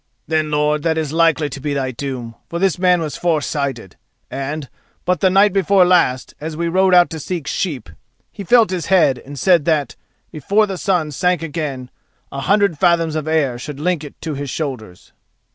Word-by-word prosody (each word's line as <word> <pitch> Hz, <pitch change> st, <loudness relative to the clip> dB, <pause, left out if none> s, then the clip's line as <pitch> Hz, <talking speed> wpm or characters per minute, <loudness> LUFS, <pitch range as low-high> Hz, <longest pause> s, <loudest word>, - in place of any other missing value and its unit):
"Then, 155 Hz, 0 st, 0 dB
lord, 150 Hz, 0 st, +1 dB
that 160 Hz, +1 st, 0 dB
is 155 Hz, -2 st, -2 dB
likely 165 Hz, -2 st, +2 dB
to 135 Hz, -, -6 dB
be 145 Hz, +1 st, -3 dB
thy 130 Hz, -2 st, -1 dB
doom, 125 Hz, -2 st, -6 dB, 0.2 s
for 170 Hz, -, -4 dB
this 185 Hz, -1 st, +1 dB
man 180 Hz, -1 st, +3 dB
was 155 Hz, -2 st, -4 dB
foresighted, 140 Hz, -, -2 dB, 0.3 s
and, 140 Hz, +2 st, -4 dB, 0.4 s
but 180 Hz, -2 st, +1 dB
the 190 Hz, -, +3 dB
night 195 Hz, +1 st, +4 dB
before 195 Hz, -1 st, +4 dB
last, 170 Hz, -9 st, +2 dB
as 155 Hz, 0 st, -5 dB
we 170 Hz, 0 st, -1 dB
rode 185 Hz, +2 st, +3 dB
out 175 Hz, -1 st, +5 dB
to 160 Hz, -, -5 dB
seek 165 Hz, 0 st, -4 dB
sheep, 145 Hz, -, -3 dB, 0.4 s
he 200 Hz, -, -8 dB
felt 230 Hz, +1 st, +4 dB
his 180 Hz, -4 st, -3 dB
head, 160 Hz, -9 st, +3 dB
and 140 Hz, +1 st, -11 dB
said 170 Hz, 0 st, +3 dB
that, 155 Hz, -4 st, 0 dB, 0.4 s
before 200 Hz, +9 st, +1 dB
the 190 Hz, -3 st, -5 dB
sun 175 Hz, -6 st, 0 dB
sank 180 Hz, +3 st, 0 dB
again, 145 Hz, -5 st, -5 dB, 0.4 s
a 140 Hz, -, -5 dB
hundred 195 Hz, +1 st, +1 dB
fathoms 170 Hz, -3 st, +2 dB
of 155 Hz, -1 st, -3 dB
air 145 Hz, -6 st, 0 dB
should 145 Hz, +2 st, -7 dB
link 170 Hz, 0 st, -1 dB
it 145 Hz, -, -11 dB
to 160 Hz, -, -4 dB
his 140 Hz, 0 st, -5 dB
shoulders." 125 Hz, -, -6 dB
155 Hz, 195 wpm, -18 LUFS, 140-180 Hz, 0.4 s, out